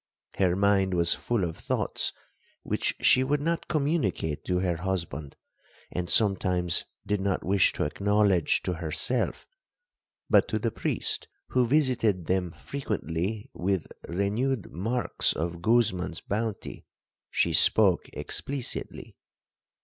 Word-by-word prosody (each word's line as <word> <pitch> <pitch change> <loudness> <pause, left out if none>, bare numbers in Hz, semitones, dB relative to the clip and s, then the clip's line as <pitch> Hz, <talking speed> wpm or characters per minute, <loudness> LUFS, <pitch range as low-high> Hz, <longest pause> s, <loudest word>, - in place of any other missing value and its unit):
Her 90 -2 +3
mind 100 -1 +2
was 85 -1 +4
full 120 -5 -1
of 85 -2 -2
thoughts - - -1 0.5
which - - 0
she 130 - +6
would 145 +2 +1
not 165 +3 -1
communicate 135 - -1
to 90 - 0
her 90 -3 0
husband, 85 -5 -4 0.6
and 90 -1 -3
sometimes 90 -5 +2 0.2
did 105 -1 0
not 95 -1 -1
wish 95 0 +3
to - - -1
acknowledge 100 +2 +2
to 90 - -1
herself; 85 +9 -2 0.8
but - - +4
to - - -1
the - - -1
priest, - - -1 0.2
who 125 -2 +2
visited 120 - +2
them 90 0 0
frequently 105 - -4
with 95 -1 -2 0.2
renewed 105 +6 -1
marks 115 +8 0
of 85 +2 -4
Guzman's 105 -6 +2
bounty, 110 0 -4 0.4
she - - +1
spoke - - +4
explicitly. 135 -3 -3
95 Hz, 120 wpm, -27 LUFS, 90-115 Hz, 0.8 s, she